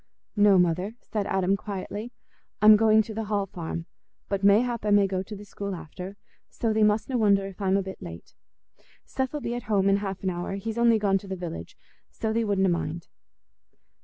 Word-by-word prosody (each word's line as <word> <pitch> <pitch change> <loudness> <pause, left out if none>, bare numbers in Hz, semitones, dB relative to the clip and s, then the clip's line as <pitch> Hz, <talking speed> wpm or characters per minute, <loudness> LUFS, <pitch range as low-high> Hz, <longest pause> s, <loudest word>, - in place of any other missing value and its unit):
"No, 205 -2 +6
Mother," 180 +4 +1
said 210 -2 -3
Adam, 190 0 +1
quietly. 205 +3 -6 0.5
"I'm 215 0 +8
going 220 0 +5
to 220 - -8
the 220 +1 -3
Hall 205 -1 0
Farm, 170 -2 -6 0.4
but 200 -1 -2
mayhap 230 +3 +3
I 210 - 0
may 205 -1 +5
go 190 -1 -1
to 210 +3 -8
the 205 +1 -10
school 200 -1 -5
after, 180 +4 -8 0.3
so 225 -2 -1
thee 220 - +1
mustna 215 +4 +2
wonder 200 -2 +3
if 195 +1 -9
I'm 195 0 +2
a 195 - 0
bit 190 0 -8
late. 85 -1 -10 0.7
Seth 265 +2 -3
'ull 295 - -3
be 235 -1 -3
at 240 -3 -6
home 200 -2 +3
in 195 - +4
half 195 -1 -5
an 190 - 0
hour—he's 195 +6 -4
only 235 -1 +5
gone 200 -2 +2
to 195 - -13
the 190 - -3
village; 165 - -7 0.3
so 220 -1 -3
thee 230 +1 +1
wutna 200 -3 +2
mind." 170 -1 -3
200 Hz, 200 wpm, -26 LUFS, 190-215 Hz, 0.7 s, I'm